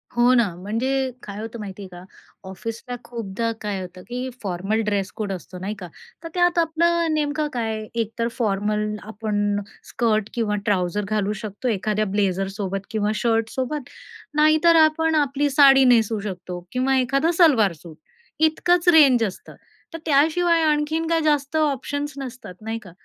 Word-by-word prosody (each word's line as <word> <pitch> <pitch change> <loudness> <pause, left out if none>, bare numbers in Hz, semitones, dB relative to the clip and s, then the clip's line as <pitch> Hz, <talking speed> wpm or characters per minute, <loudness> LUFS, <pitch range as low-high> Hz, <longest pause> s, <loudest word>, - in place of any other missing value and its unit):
हो 240 +1 +5
ना. 235 -4 +4
म्हणजे 255 +8 -1
काय 205 0 -7
होतं 225 +1 -7
माहिती 200 -1 -7
आहे - - -8
का, 175 0 -11 0.5
ऑफिसला 230 +6 -6
खूपदा 230 -1 -3
काय 205 -3 -3
होतं, 180 0 -9
की 250 +2 -4
फॉर्मल 195 +4 -1
ड्रेस 200 -1 -1
कोड 205 -3 -3
असतो 180 0 -8
नाही 200 +3 -3
का, 180 - -7 0.4
तर - - -5
त्यात 350 -1 +2
आपलं 335 0 +2
नेमकं 300 0 0
काय, 220 -2 -2
एकतर 230 0 -2
फॉर्मल 210 -1 0 0.2
आपण 205 -2 -1 0.3
स्कर्ट 220 -3 0
किंवा 220 -3 0
ट्राउझर 200 0 0
घालू 210 -1 0
शकतो, 215 +4 -5
एखाद्या 215 0 0
ब्लेझरसोबत 195 0 -1
किंवा 215 -1 0
शर्टसोबत, 240 +5 -1 0.5
नाहीतर 310 +2 +5
आपण 320 +1 +1
आपली 290 0 +1
साडी 270 -1 +6
नेसू 220 -1 +1
शकतो 180 -3 -6
किंवा 260 +1 +1
एखादा 275 +6 +2
सलवार-सूट, 195 - +3 0.4
इतकंच 340 +3 +2
रेंज 275 -8 +6
असतं. 195 -4 -6 0.4
तर - - -4
त्याशिवाय 325 +3 +3
आणखीन 310 +1 +1
काय 330 -1 +2
जास्त 295 -1 0
ऑप्शन्स 290 0 -1
नसतात, 255 -8 -8
नाही 225 +1 -4
का 185 - -12
230 Hz, 150 wpm, -23 LUFS, 205-290 Hz, 0.5 s, साडी